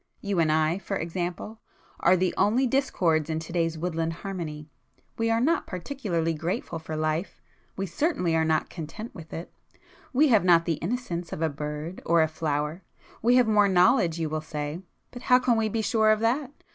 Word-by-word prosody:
You 200 -3 -1
and 160 -2 +3
I, 155 +3 +2
for 185 - -4
example, 175 +6 -4 0.4
are 185 +2 +4
the 185 0 +1
only 240 +6 +3
discords 175 - +1
in 160 - -1
to 165 +1 -7
day's 165 -2 0
woodland 165 -1 -2
harmony. 165 -5 -6 0.5
We 230 0 0
are 225 0 +2
not 315 +8 +1
particularly 180 - -2
grateful 165 +1 -3
for 160 0 -6
life,—we 155 +4 -4
certainly 185 - 0
are 160 - +3
not 160 -1 +1
content 170 +7 -7
with 165 -2 -11
it,—we 270 - -3
have 220 -7 +5
not 170 -2 +5
the 165 -3 -1
innocence 175 -4 -3
of 160 - -3
a 160 - +2
bird 150 +4 -5
or 170 -1 +4
a - - +1
flower. 155 +1 -2 0.4
We 240 +2 +4
have 250 -2 +5
more 210 -2 +4
knowledge 180 -2 +4
you 165 -1 -1
will 155 0 -3
say,—but 155 +9 -7
how 250 0 +5
can 250 -1 +2
we 220 -1 +1
be 220 +1 -1
sure 220 0 +3
of 215 0 +4
that? 255 +4 0
175 Hz, 185 wpm, -26 LUFS, 160-220 Hz, 0.5 s, have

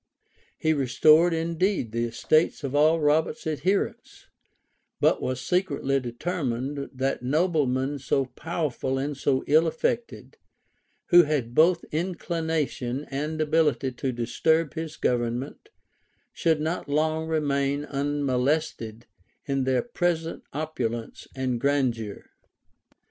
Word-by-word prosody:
He 160 - +2
restored 155 +5 +4
indeed 165 - 0
the 115 +1 -1
estates 155 +7 +1
of 135 -1 -3
all 155 +3 +4
Robert's 155 +9 +1
adherents; 180 +6 -2 0.7
but - - +3
was 130 -1 -2
secretly 135 -2 0
determined, 135 0 -3
that 135 0 -2
noblemen 140 -2 +1
so 135 +1 0
powerful 135 -2 -3
and 140 +2 -2
so 135 -1 0
ill 160 +3 +4
affected, 235 +9 -3 0.7
who 175 - +9
had 145 -7 -1
both 170 +4 +4
inclination 160 -6 -2
and 150 +3 -3
ability 155 -3 +2
to 130 +1 -3
disturb 150 +7 +1
his 160 -1 -5
government, 120 - -2 0.6
should 160 -3 +1
not 160 -1 -3
long 155 +2 0
remain 145 -2 0
unmolested 140 -4 -1 0.4
in 135 -3 0
their 130 -1 +1
present 175 -8 -1
opulence 125 -7 -4
and 130 -3 -2
grandeur. 125 -7 0
145 Hz, 110 wpm, -26 LUFS, 130-160 Hz, 0.7 s, who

